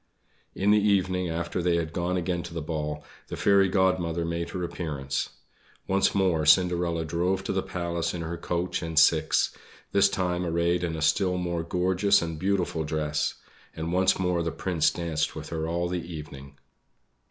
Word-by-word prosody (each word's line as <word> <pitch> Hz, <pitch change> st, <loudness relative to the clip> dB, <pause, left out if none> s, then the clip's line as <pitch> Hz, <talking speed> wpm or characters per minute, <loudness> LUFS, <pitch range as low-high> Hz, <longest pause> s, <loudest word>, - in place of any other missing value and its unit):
In 100 Hz, +2 st, +2 dB
the 105 Hz, 0 st, +5 dB
evening 95 Hz, -3 st, +1 dB
after 85 Hz, +2 st, -2 dB
they 85 Hz, 0 st, +2 dB
had 80 Hz, -1 st, -2 dB
gone 90 Hz, +1 st, -1 dB
again 90 Hz, 0 st, -1 dB
to 85 Hz, 0 st, -9 dB
the 85 Hz, -, -2 dB
ball, 75 Hz, -2 st, -3 dB, 0.2 s
the -, -, -6 dB
Fairy 100 Hz, -1 st, +4 dB
Godmother 90 Hz, -3 st, +1 dB
made 85 Hz, 0 st, -3 dB
her 90 Hz, +1 st, -4 dB
appearance. 75 Hz, -6 st, -3 dB, 0.6 s
Once 95 Hz, +1 st, +2 dB
more 90 Hz, -5 st, +2 dB
Cinderella 85 Hz, 0 st, +3 dB
drove 90 Hz, +4 st, 0 dB
to -, -, -2 dB
the 95 Hz, -, +1 dB
Palace 85 Hz, -2 st, -2 dB
in 85 Hz, -1 st, -4 dB
her 85 Hz, +1 st, -4 dB
coach 85 Hz, +1 st, -2 dB
and 80 Hz, -2 st, -5 dB
six; 80 Hz, -, +4 dB, 0.4 s
this 100 Hz, -, +4 dB
time 90 Hz, -1 st, -1 dB
arrayed 85 Hz, +1 st, +1 dB
in 85 Hz, -2 st, -2 dB
a 80 Hz, -, -3 dB
still 90 Hz, +2 st, +2 dB
more 85 Hz, -2 st, -2 dB
gorgeous 95 Hz, +4 st, +2 dB
and 80 Hz, -2 st, -4 dB
beautiful 90 Hz, -4 st, 0 dB
dress; 75 Hz, -1 st, -1 dB, 0.4 s
and 80 Hz, +2 st, -3 dB
once 95 Hz, +1 st, +3 dB
more 90 Hz, -2 st, 0 dB
the 85 Hz, -, -1 dB
Prince 80 Hz, 0 st, +1 dB
danced 80 Hz, -3 st, -2 dB
with 80 Hz, 0 st, -7 dB
her 80 Hz, -1 st, -3 dB
all 85 Hz, +1 st, -1 dB
the 90 Hz, 0 st, -2 dB
evening. 75 Hz, -4 st, -9 dB
85 Hz, 175 wpm, -27 LUFS, 80-90 Hz, 0.6 s, the